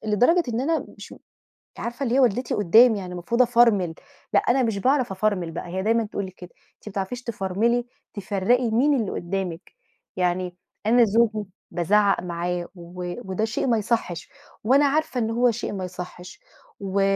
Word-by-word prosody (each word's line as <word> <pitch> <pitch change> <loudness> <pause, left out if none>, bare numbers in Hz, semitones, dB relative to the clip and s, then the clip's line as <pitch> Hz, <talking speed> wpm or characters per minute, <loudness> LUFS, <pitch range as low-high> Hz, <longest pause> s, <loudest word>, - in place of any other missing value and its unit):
لدرجة 245 - +3
إن 235 0 -1
أنا 320 +4 0
مش - - -10 0.6
عارفة، 240 +4 -4
اللي 245 0 0
هي - - +4
والدتي 250 -1 +2
قدامي 215 +3 +5
يعني، 180 -1 -7
المفروض 190 +8 0
أفرمل، 230 -8 +4 0.4
لأ، - - +6
أنا 260 +2 +2
مش 225 -4 0
باعرف 255 -1 +2
افرمل 190 -3 -1
بقى، 170 - -6
هي 190 +2 -3
دايمًا 225 +1 +2
تقول 200 -1 -4
لي 185 - -9
كده، 180 -1 -12 0.3
أنتِ - - -19
مبتعرفيش 200 +5 -4
تفرملي، 230 +3 0 0.3
تفرّقي 220 +4 0
مين 275 +6 +3
اللي 210 - -3
قدّامِك 180 -1 -4 0.4
يعني. 180 0 -1 0.3
أنا 235 +2 +5
زوجي 215 -2 +1 0.2
بازعق 200 +3 +2
معاه، 175 0 -3
و 175 0 -7 0.2
وده 215 +4 0
شيء 220 +4 -2
ما 230 -2 +3
يصحش، 205 -6 -2 0.3
وأنا 270 +6 +4
عارفة 285 -2 0
إن 225 -2 0
هو 240 +2 +3
شيء 230 -1 -4
ما 190 -2 -4
يصحش، 180 0 -9 0.4
و 195 0 -1
210 Hz, 170 wpm, -24 LUFS, 185-240 Hz, 0.6 s, لأ